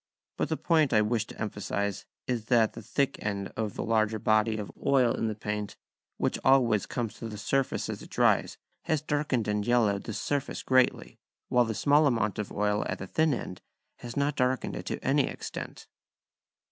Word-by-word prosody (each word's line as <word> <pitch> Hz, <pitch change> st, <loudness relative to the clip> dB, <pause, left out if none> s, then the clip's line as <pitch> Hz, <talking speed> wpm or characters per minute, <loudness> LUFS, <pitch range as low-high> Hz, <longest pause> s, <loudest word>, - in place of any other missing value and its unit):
But -, -, -1 dB
the -, -, -1 dB
point 155 Hz, -6 st, +2 dB
I 110 Hz, -1 st, +5 dB
wish 110 Hz, 0 st, 0 dB
to -, -, -12 dB
emphasise 100 Hz, -1 st, -3 dB, 0.2 s
is 120 Hz, -4 st, -2 dB
that 120 Hz, 0 st, +4 dB
at 110 Hz, -1 st, +2 dB
the -, -, -8 dB
thick 140 Hz, -1 st, -1 dB
end 100 Hz, -1 st, -3 dB
the 110 Hz, -2 st, -3 dB
larger 110 Hz, -1 st, +1 dB
body 110 Hz, +1 st, +2 dB
of 105 Hz, -2 st, -5 dB
oil 130 Hz, -4 st, +4 dB
in 115 Hz, -, -1 dB
the 110 Hz, -, -2 dB
paint, 105 Hz, -1 st, -4 dB, 0.4 s
which -, -, -1 dB
always 120 Hz, -6 st, +4 dB
comes 120 Hz, -4 st, -3 dB
to 115 Hz, -, -5 dB
the 105 Hz, -, -7 dB
surface 130 Hz, +6 st, 0 dB
as -, -, -5 dB
it -, -, -11 dB
dries, -, -, +2 dB, 0.3 s
has 155 Hz, -3 st, 0 dB
darkened 145 Hz, -6 st, 0 dB
and 105 Hz, 0 st, 0 dB
yellowed 105 Hz, -4 st, +2 dB
the 110 Hz, -, -4 dB
surface 140 Hz, +5 st, -2 dB
greatly; 130 Hz, -1 st, +2 dB, 0.3 s
while 125 Hz, -1 st, +4 dB
the 110 Hz, -1 st, -3 dB
small 145 Hz, +7 st, +4 dB
amount 110 Hz, -6 st, 0 dB
of 105 Hz, -, -4 dB
oil 105 Hz, 0 st, 0 dB
at -, -, -2 dB
the 95 Hz, -, -6 dB
thin 160 Hz, -, +2 dB
end 95 Hz, -8 st, -4 dB, 0.4 s
has 120 Hz, +1 st, -8 dB
not 140 Hz, +1 st, +1 dB
darkened 125 Hz, 0 st, 0 dB
it -, -, -6 dB
to -, -, -4 dB
any -, -, +3 dB
extent. -, -, -7 dB
115 Hz, 195 wpm, -28 LUFS, 105-130 Hz, 0.4 s, I